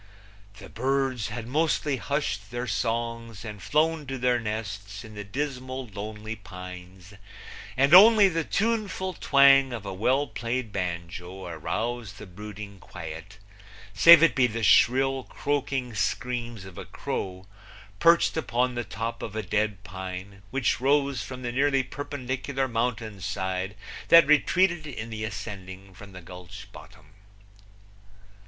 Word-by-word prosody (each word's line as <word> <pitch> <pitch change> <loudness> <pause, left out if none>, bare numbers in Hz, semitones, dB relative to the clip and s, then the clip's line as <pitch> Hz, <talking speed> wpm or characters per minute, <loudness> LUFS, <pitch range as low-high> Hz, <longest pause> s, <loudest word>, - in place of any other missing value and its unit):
The - - -11
birds 130 -1 -1
had 115 -2 -6
mostly 150 +1 0
hushed 110 -8 -2
their 120 +2 -4
songs 115 -2 -3
and 105 -2 -7
flown 155 - +1
to 135 0 -4
their 125 -1 +2
nests 105 -2 -5
in 110 -2 -11
the 105 -1 -6
dismal 130 +3 -4
lonely 105 +1 -6
pines, 90 -2 -11 0.6
and 135 +4 +4
only 210 +2 +9
the 165 -3 -1
tuneful 200 -2 -1
twang 135 -3 +5
of 115 -4 -6
a 100 - -4
well 130 +9 +1
played 120 -3 -3
banjo 90 0 -5
aroused 105 +6 -4
the 105 - -9
brooding 100 +1 -9
quiet, 85 +4 -9 0.6
save 170 -1 +9
it 165 - +5
be 130 -3 +3
the 115 0 -4
shrill, 135 +3 +4
croaking 135 -3 -2
screams 120 -2 -2
of 95 -2 -10
a - - -7
crow, 95 0 -5 0.5
perched 170 0 +4
upon 125 -4 0
the 120 0 -2
top 115 +2 -5
of 110 - -6
a 110 - -2
dead 105 0 -1
pine, 95 +1 -7
which 130 0 0
rose 140 0 +2
from 130 -1 -7
the 120 - -2
nearly 135 +1 +2
perpendicular 135 0 -3
mountain 115 -3 -2
side 95 0 -3 0.3
that 165 -2 +8
retreated 170 +3 +3
in 115 -5 -6
the 110 -1 -5
ascending 95 -2 -7
from 100 +2 -13
the 95 -1 -10
gulch 90 +4 -10
bottom. - - -15
115 Hz, 140 wpm, -26 LUFS, 100-135 Hz, 0.6 s, only